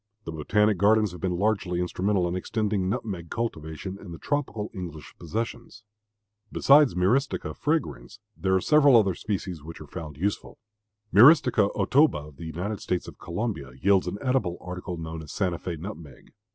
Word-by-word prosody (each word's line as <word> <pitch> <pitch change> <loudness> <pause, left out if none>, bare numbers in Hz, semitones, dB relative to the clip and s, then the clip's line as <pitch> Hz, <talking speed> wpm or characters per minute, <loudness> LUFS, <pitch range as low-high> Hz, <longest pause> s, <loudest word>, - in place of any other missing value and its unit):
The - - -6
botanic 105 +6 +1
gardens 105 0 +4
have 90 - -10
been 90 -2 -1
largely 95 -3 0
instrumental 90 +1 0
in 85 - -2
extending 100 0 -1
nutmeg 95 -5 -4
cultivation 95 -4 -4
in 100 - -10
the 85 - -7
tropical 130 - -3
English 85 -7 -8
possessions. 115 +5 -5 0.7
Besides 140 -4 +5
Myristica 120 +10 0
fragrans 110 - -2 0.2
there 95 0 +1
are 95 - +2
several 145 -2 +6
other 100 -4 +3
species 95 -4 -4
which 80 +3 -10
are 75 - -9
found 75 -1 -8
useful. 100 +6 -3 0.6
M. 105 - +7
Otoba 125 - +4
of 70 - -19
the 85 - -8
U. 80 - -6
S. 90 -1 -3
of - - -11
Colombia 85 - -4
yields 100 +2 +3
an - - -3
edible 125 -10 0
article 90 -1 -6
known 80 0 -6
as 75 - -10
Santa 90 -4 -1
Fé 85 -2 -5
nutmeg. 80 - -10
95 Hz, 165 wpm, -26 LUFS, 85-110 Hz, 0.7 s, M